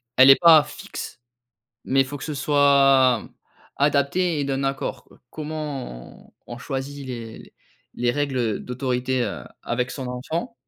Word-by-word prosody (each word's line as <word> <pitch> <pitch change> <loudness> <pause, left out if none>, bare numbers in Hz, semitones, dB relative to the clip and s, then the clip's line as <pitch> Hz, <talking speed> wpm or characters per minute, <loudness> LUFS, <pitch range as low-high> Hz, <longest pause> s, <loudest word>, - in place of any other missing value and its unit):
Elle 130 +1 +7
est 135 - +10
pas 160 -3 +8
fixe, 145 -3 -9 0.7
mais 135 +1 +3
faut 145 +2 -7
que - - -9
ce 155 - -4
soit 135 -4 +3 0.5
adapté 150 +4 +1
et 145 - 0
d'un 135 0 -2
accord, 135 0 -3
quoi. - - -22
Comment 150 - -7 0.2
on - - -7
on - - -11
choisit 135 +2 -5
les 115 -3 -9 0.4
les 120 - 0
règles 130 -5 -1
d'autorité, 125 0 -2
heu, 75 - -5 0.2
avec 125 +1 -2
son 130 -3 -6
enfant. 160 - -4
135 Hz, 145 wpm, -23 LUFS, 125-145 Hz, 0.7 s, est